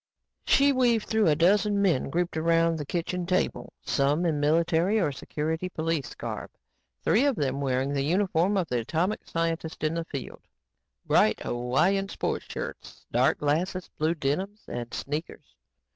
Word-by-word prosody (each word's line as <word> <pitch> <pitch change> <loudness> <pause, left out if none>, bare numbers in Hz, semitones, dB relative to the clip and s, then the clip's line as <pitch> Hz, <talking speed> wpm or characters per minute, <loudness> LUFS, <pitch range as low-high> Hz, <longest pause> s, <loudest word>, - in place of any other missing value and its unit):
She 280 +1 +5
weaved 240 -4 +2
through 220 -3 +2
a 150 - +4
dozen 200 +5 +3
men 180 -11 +2
grouped 175 +3 -1
around 165 0 +2
the 145 - -5
kitchen 175 +1 -2
table, 185 0 -1
some 145 +5 +1
in 155 -3 +1
military 165 +6 +2
or 165 -7 +1
security 160 +6 -3
police 160 -4 -2
garb, - - -5 0.5
three 225 - +3
of 285 -3 +2
them 140 -4 -1
wearing 135 +1 0
the 140 - 0
uniform 180 +4 +1
of 180 -3 0
the 125 -3 0
atomic 170 - -1
scientist 165 -1 -2
in 155 +1 +1
the 165 0 -2
field 140 -5 -7 0.6
bright - - +3
Hawaiian 155 +12 +1
sports - - -3
shirts, - - -7
dark - - +3
glasses, 175 +5 -1
blue 160 +2 +1
denims 185 +9 -2
and 120 0 -5
sneakers. 145 - -5
165 Hz, 155 wpm, -27 LUFS, 145-185 Hz, 0.6 s, She